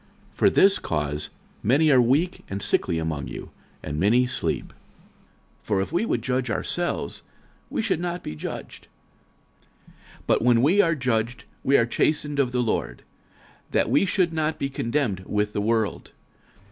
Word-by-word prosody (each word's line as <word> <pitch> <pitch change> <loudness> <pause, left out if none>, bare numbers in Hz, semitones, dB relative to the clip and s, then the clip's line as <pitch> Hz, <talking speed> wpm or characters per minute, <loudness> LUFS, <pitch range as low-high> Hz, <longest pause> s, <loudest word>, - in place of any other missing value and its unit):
46:011:030 - - -30
For - - +6
this 195 0 +4
cause 75 -1 -2 0.3
many 145 +8 +3
are 130 -2 +6
weak 145 +10 +1
and 100 - -3
sickly 85 -3 +1
among 75 -5 -3
you, 65 - -8 0.3
and 75 0 -4
many 120 +7 +4
sleep. 125 - -2 0.9
46:011:031 - - -32
For 100 -3 +1
if 95 - -4
we 175 +7 +1
would - - 0
judge 125 -1 -1
ourselves, 175 +8 -2 0.5
we - - -1
should 205 -7 0
not 175 0 -3
be 75 - -5
judged. 75 - -7 1.0
46:011:032 - - -21 0.3
But - - +2
when 120 0 +4
we 185 +8 +5
are 165 -3 +2
judged, 125 -3 -1 0.2
we 140 - +4
are 115 - +3
chastened 150 +3 0
of 130 -3 +2
the 125 -1 +1
Lord, 115 - -2 0.7
that - - +1
we 195 - +3
should 180 -4 +1
not 155 -1 -1
be 135 - -2
condemned 115 -6 -1
with 105 0 -1
the 105 - -1
world. 110 0 -1
125 Hz, 170 wpm, -25 LUFS, 105-155 Hz, 1.0 s, For